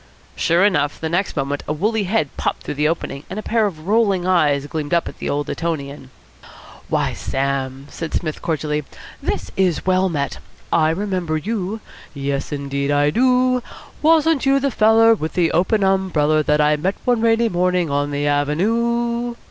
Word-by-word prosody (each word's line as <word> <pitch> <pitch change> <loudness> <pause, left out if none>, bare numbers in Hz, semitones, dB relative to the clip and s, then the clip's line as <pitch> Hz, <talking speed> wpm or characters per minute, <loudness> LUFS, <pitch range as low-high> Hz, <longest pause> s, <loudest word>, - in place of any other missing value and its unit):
Sure 170 +4 +3
enough, 150 -8 +1
the 160 - -3
next 175 +1 -1
moment 140 +1 -1
a 150 - 0
woolly 210 +6 0
head 180 -7 -1
popped - - -2
through - - -4
the 150 +1 +1
opening, 150 -3 -3
and 185 - -6
a 215 - -4
pair 225 -2 +1
of 160 -5 -8
rolling 200 -4 +2
eyes 150 -6 +2
gleamed 150 +1 -2
up 170 - +1
at - - -9
the - - -3
old 145 0 -1
Etonian. 140 -5 -4 0.8
"Why, - - 0
Sam!" 135 0 -2
said 165 -1 -5
Psmith 155 -3 -3
cordially, 150 -2 -2 0.4
"this - - -3
is 185 -3 +1
well 185 0 +2
met! 145 -4 -3 0.3
I 155 -1 +4
remember 180 -2 -1
you. 210 +3 -3 0.3
Yes, 140 0 -3
indeed, 140 -1 -2
I 145 0 +3
do. 255 +3 +3 0.4
Wasn't 320 -2 +3
you 275 0 +3
the 275 0 0
feller 225 +1 +5
with 160 -7 -3
the 170 -2 +2
open 195 +4 +2
umbereller 175 -6 +2
that 150 0 +2
I 150 0 +3
met 190 +6 -1
one 245 -2 +2
rainy 230 0 +3
morning 180 -4 0
on 145 0 0
the 145 0 -1
Av 145 0 +1
en 150 +2 -2
ue? 235 +3 0
170 Hz, 180 wpm, -20 LUFS, 145-215 Hz, 0.8 s, feller